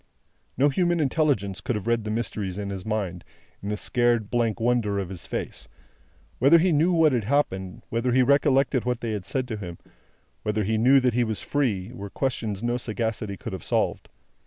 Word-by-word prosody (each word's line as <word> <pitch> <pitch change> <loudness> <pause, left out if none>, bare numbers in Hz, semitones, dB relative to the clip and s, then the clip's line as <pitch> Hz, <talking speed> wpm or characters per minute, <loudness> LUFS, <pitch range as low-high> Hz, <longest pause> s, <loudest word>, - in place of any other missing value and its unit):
No 145 +2 +4
human 175 +3 +1
intelligence 135 - +1
could 125 - -2
have 105 - -4
read 115 -2 +1
the - - -3
mysteries 105 -4 -3
of 100 -1 -4
his 95 -2 -5
mind, 95 -5 -2 0.4
in 100 - -5
the 105 - -1
scared 120 -2 +1
blank 120 -2 +1
wonder 115 -3 +1
of 95 -3 -3
his 95 -3 -8
face. - - -4 0.7
Whether 140 +7 +7
he 175 +2 +3
knew 160 +4 +3
what 165 -3 +4
had 120 -5 0
happened, 95 -8 -1
whether 115 +2 0
he 130 +1 +4
recollected 135 -1 +3
what 125 -1 -1
they 115 - -2
had 100 -3 -4
said 130 +2 -2
to 110 - -3
him, 90 -4 -7 0.6
whether 105 0 -1
he 110 +2 0
knew 130 +4 +6
that 125 -2 +2
he 120 +1 +2
was 110 -2 -3
free, 115 -8 -1
were 100 -5 -7
questions 110 -5 -2
which - - 0
no 120 +1 +1
sagacity 110 -3 -3
could - - -7
have - - -6
solved. - - 0
115 Hz, 205 wpm, -25 LUFS, 105-130 Hz, 0.7 s, Whether